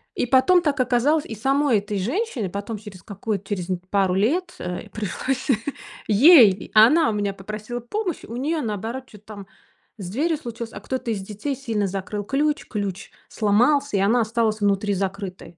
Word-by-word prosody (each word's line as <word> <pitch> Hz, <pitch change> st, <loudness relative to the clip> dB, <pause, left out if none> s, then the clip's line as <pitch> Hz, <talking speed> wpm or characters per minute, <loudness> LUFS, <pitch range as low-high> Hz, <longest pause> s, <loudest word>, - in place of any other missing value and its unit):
И -, -, 0 dB
потом 270 Hz, +9 st, +4 dB
так 295 Hz, -4 st, -1 dB
оказалось, 255 Hz, +5 st, +2 dB
и 225 Hz, -, -7 dB
самой 270 Hz, +1 st, +2 dB
этой 205 Hz, 0 st, -4 dB
женщине 255 Hz, -, -2 dB
потом 200 Hz, +4 st, -5 dB
через 200 Hz, -4 st, -12 dB
какую-то 200 Hz, 0 st, -4 dB
через 185 Hz, -4 st, -3 dB, 0.2 s
пару 195 Hz, -2 st, +2 dB
лет, 325 Hz, -, 0 dB
э, 180 Hz, 0 st, -5 dB
пришлось 250 Hz, -, -3 dB, 0.6 s
ей 225 Hz, -, +6 dB
Она 245 Hz, +9 st, +6 dB
у -, -, -1 dB
меня 205 Hz, -1 st, -1 dB
попросила 215 Hz, +4 st, -6 dB
помощь, 360 Hz, -, -4 dB
у 230 Hz, -, -8 dB
нее, 305 Hz, +5 st, -1 dB
наоборот, 230 Hz, +3 st, -4 dB
чё-то 210 Hz, -3 st, -16 dB
там 200 Hz, -3 st, -10 dB, 0.5 s
с 190 Hz, -4 st, -7 dB
дверью 305 Hz, -, 0 dB
случилось, 235 Hz, -4 st, -7 dB
а -, -, -7 dB
кто-то 260 Hz, -3 st, -4 dB
из 210 Hz, -, -2 dB
детей 215 Hz, +8 st, -4 dB
сильно 225 Hz, -6 st, -2 dB
закрыл 195 Hz, +2 st, -4 dB
ключ, 290 Hz, +7 st, 0 dB
ключ 200 Hz, -2 st, -4 dB, 0.2 s
сломался, 240 Hz, +4 st, +2 dB
и -, -, +1 dB
она 220 Hz, +5 st, +3 dB
осталась 220 Hz, -1 st, 0 dB
внутри 200 Hz, 0 st, +1 dB
закрытой. 190 Hz, -3 st, -5 dB
220 Hz, 170 wpm, -23 LUFS, 200-270 Hz, 0.6 s, ей